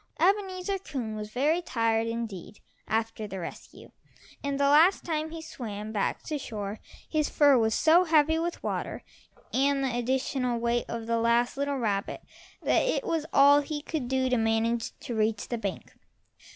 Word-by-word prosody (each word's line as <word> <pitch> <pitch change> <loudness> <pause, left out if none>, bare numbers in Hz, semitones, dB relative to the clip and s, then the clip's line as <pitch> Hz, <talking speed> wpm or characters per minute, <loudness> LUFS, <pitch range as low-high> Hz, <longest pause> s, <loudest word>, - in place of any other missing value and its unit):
Ebenezer 385 +1 +1
Coon 250 - -5
was 210 0 -6
very 295 +9 +1
tired 230 -6 0
indeed 225 -4 -5 0.3
after 225 -1 -2
the 195 -1 -6
rescue, 170 - -9 0.5
and 280 0 -2
the - - +2
last 315 +7 +5
time 315 -1 -2
he 325 0 -8
swam 215 -7 -6
back 210 -2 -1
to 305 -2 -3
shore 210 -4 -5 0.3
his 305 -2 0
fur 290 -2 +5
was 220 -2 +2
so 335 +3 +5
heavy 320 0 +3
with 340 +1 -3
water - - -3 0.5
and 275 +1 +2
the 255 -3 -1
additional 255 0 0
weight 235 +1 0
of 230 -1 -5
the 230 0 0
last 235 +1 +2
little 280 0 -1
rabbit 205 -5 -2 0.4
that - - +3
it - - 0
was 325 -8 -1
all 285 +1 +6
he 295 +1 -4
could 305 -6 -3
do 260 0 +1
to 250 -1 +2
manage 225 +1 0
to 250 - -5
reach 215 -1 0
the 240 - -1
bank. 200 -4 -5
255 Hz, 170 wpm, -28 LUFS, 225-305 Hz, 0.5 s, all